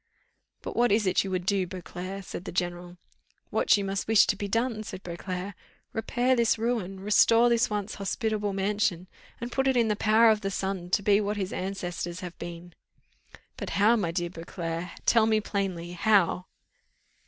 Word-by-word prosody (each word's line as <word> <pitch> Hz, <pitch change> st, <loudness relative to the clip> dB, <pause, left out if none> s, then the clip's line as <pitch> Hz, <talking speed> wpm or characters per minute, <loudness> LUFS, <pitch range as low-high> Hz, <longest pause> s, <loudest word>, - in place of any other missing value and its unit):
"But -, -, -6 dB
what 240 Hz, -1 st, +3 dB
is 210 Hz, +1 st, +3 dB
it 185 Hz, -, +2 dB
you 195 Hz, -, -5 dB
would 180 Hz, -1 st, -2 dB
do, 195 Hz, -2 st, +1 dB
Beauclerc?" 185 Hz, +2 st, -7 dB
said 180 Hz, -, -7 dB
the -, -, -5 dB
general. 175 Hz, 0 st, -3 dB, 0.5 s
"What -, -, +4 dB
you 200 Hz, -, -2 dB
must 195 Hz, 0 st, -2 dB
wish 220 Hz, -2 st, +6 dB
to 205 Hz, -, +1 dB
be 205 Hz, 0 st, -4 dB
done," 230 Hz, +2 st, 0 dB
said 195 Hz, -3 st, -8 dB
Beauclerc. 180 Hz, +2 st, -5 dB, 0.4 s
"Repair 240 Hz, +3 st, +1 dB
this 235 Hz, -2 st, +2 dB
ruin, 220 Hz, -5 st, -2 dB
restore 230 Hz, +3 st, +5 dB
this 235 Hz, +1 st, +2 dB
once 210 Hz, 0 st, -3 dB
hospitable 210 Hz, +1 st, -2 dB
mansion, 195 Hz, -2 st, 0 dB, 0.3 s
and 235 Hz, +1 st, -5 dB
put 270 Hz, +1 st, +1 dB
it 265 Hz, -1 st, +3 dB
in 230 Hz, -2 st, +3 dB
the 210 Hz, -, +2 dB
power 220 Hz, +2 st, +5 dB
of 215 Hz, -1 st, 0 dB
the 195 Hz, -, -2 dB
son 190 Hz, -2 st, -3 dB
to 200 Hz, +2 st, +1 dB
be 205 Hz, +1 st, +4 dB
what 205 Hz, 0 st, -2 dB
his 190 Hz, -1 st, -3 dB
ancestors 180 Hz, -1 st, -4 dB
have 180 Hz, -1 st, -7 dB
been." 170 Hz, 0 st, -8 dB, 0.8 s
"But -, -, -5 dB
how 210 Hz, +4 st, +5 dB
my 200 Hz, -7 st, 0 dB
dear 175 Hz, 0 st, -2 dB
Beauclerc? 165 Hz, 0 st, -5 dB, 0.2 s
Tell 225 Hz, -2 st, +4 dB
me 220 Hz, -1 st, +3 dB
plainly 190 Hz, -5 st, -3 dB
how?" 185 Hz, -1 st, +2 dB
195 Hz, 185 wpm, -27 LUFS, 180-220 Hz, 0.8 s, wish